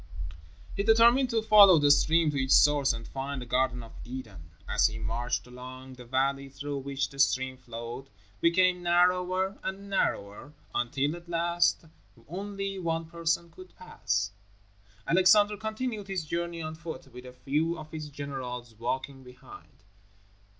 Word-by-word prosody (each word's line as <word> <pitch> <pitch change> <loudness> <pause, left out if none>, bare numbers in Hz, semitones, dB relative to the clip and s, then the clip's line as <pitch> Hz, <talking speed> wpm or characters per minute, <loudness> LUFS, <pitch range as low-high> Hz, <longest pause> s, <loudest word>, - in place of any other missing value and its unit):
He - - 0
determined 235 +4 +5
to 225 -2 0
follow 205 -5 +8
the 145 -1 +4
stream 160 +2 +4
to 140 -2 -1
its 130 - +4
source 145 -2 +5
and 115 -1 -6
find 135 +1 -5
the 125 - -6
Garden 125 0 0
of 115 - -12
Eden. 110 -10 -9 0.2
As - - +3
he 110 0 -6
marched 115 +3 -2
along, 130 +1 -10
the 125 -1 -12
valley 135 +2 0
through 140 +1 -5
which 140 0 -3
the 140 - -12
stream 130 -1 +2
flowed, 120 +1 -8 0.3
became 180 +1 +3
narrower 180 +2 +2
and 195 +1 -6
narrower, 105 - -2 0.2
until, 135 +5 0
at 170 0 -13
last, 170 0 +1 0.4
only 195 +3 -5
one 165 -2 -2
person 170 0 -2
could 185 +2 -14
pass. 100 - -2 0.7
Alexander 205 +4 +5
continued 220 0 -4
his 190 -4 -3
journey 170 +1 -3
on 155 0 -5
foot 160 -5 -9
with 125 +1 -10
a - - -9
few 150 +6 -1
of 155 -1 -10
his 155 -2 -6
generals 130 -4 -6
walking 130 +4 -4
behind. 125 -5 -15
150 Hz, 150 wpm, -28 LUFS, 130-180 Hz, 0.7 s, follow